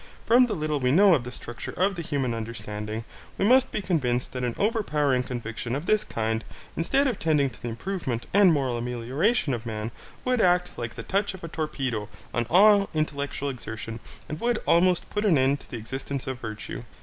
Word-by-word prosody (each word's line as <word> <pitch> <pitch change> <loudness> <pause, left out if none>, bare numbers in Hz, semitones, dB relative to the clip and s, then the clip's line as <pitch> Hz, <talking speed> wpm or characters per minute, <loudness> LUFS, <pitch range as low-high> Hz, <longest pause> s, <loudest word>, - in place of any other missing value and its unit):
From 245 +2 +6
the 220 - -2
little 155 -3 -1
we 125 -1 +2
know 195 +5 +7
of 130 -7 +1
the 125 - -5
structure 120 -1 -7
of 195 +3 +3
the 175 - -4
human 135 -6 -1
understanding, 110 -1 -5 0.3
we 195 - +1
must 260 +2 +5
be 210 - -2
convinced 125 -9 0
that 125 -1 -4
an 120 -2 -1
overpowering 150 - +1
conviction 120 -1 -4
of 145 +4 -4
this 215 +2 +3
kind, 110 0 -2 0.3
instead 270 +12 +2
of 245 -8 0
tending 150 -4 +2
to - - -16
the - - -4
improvement 125 - -3
and 200 -2 +7
moral 135 -6 +1
amelioration 130 - 0
of 115 -2 -3
man, 110 -1 -4 0.3
would 250 -2 +2
act 180 0 +3
like 115 -1 -5
the 115 - -6
touch 200 - 0
of 185 - -13
a - - -4
torpedo 135 -9 -3 0.2
on 120 -1 0
all 200 +2 +6
intellectual 145 -2 -1
exertion 115 -3 -6 0.3
and 155 - -5
would 240 -1 +2
almost 175 +1 +3
put 210 - -1
an 190 -8 +4
end 135 +2 +3
to - - -17
the 120 - -5
existence 135 +4 -4
of 130 -3 -4
virtue. 110 0 -6
140 Hz, 200 wpm, -26 LUFS, 120-185 Hz, 0.3 s, know